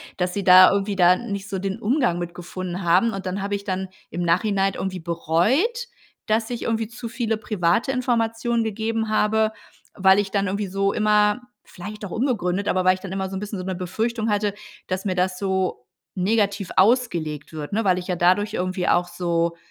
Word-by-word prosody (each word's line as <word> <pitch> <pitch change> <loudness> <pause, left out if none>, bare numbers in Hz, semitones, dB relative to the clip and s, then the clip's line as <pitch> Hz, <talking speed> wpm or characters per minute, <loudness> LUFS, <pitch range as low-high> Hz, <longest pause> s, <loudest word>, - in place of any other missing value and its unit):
dass 180 -1 -1
sie 200 -2 -3
da 185 0 +9
irgendwie 200 0 0
da 180 0 +5
nicht 200 -3 -5
so 195 -2 -3
den 195 0 -3
Umgang 220 - +1
mit 175 -1 -5
gefunden 180 +1 -6
haben 180 +7 +3
und 195 -2 -6
dann 185 +2 -3
habe 200 +1 -3
ich 200 0 -6
dann 190 -1 -3 0.2
im 175 - -4
Nachhinein 195 +3 +1
irgendwie 190 -1 -4
bereut, 215 - +1 0.4
dass 220 +1 0
ich 240 -1 -4
irgendwie 225 -1 -1
zu 230 0 -8
viele 230 -2 -1
private 215 +2 0
Informationen 235 -2 0
gegeben 220 +1 -2
habe, 215 0 +2 0.4
weil 190 0 +4
ich 195 -1 -2
dann 200 -1 +1
irgendwie 200 +1 -2
so 195 +1 0
immer 210 +1 +3 0.2
vielleicht 210 +4 -8
auch 190 - -8
unbegründet, 205 -6 -1
aber 185 0 +1
weil 185 - +6
ich 185 - -13
dann 195 - -7
immer 190 0 -3
so 190 - -6
'n - - -3
bisschen 210 -2 -5
so 185 - -5
'ne 190 - -3
Befürchtung 220 +5 -2
hatte, 205 -1 0 0.3
dass 185 0 -2
mir 185 -3 -1
das 180 0 0
so 190 -9 -1 0.3
negativ 200 0 0
ausgelegt 180 - +1
wird, 155 +2 -7
ne, 225 +2 +1
weil 185 -2 +3
ich 180 - -8
ja 180 - -1
dadurch 185 +5 +2
irgendwie 185 -2 -2
auch 175 0 +2
so 170 -1 -1
195 Hz, 200 wpm, -23 LUFS, 180-220 Hz, 0.4 s, da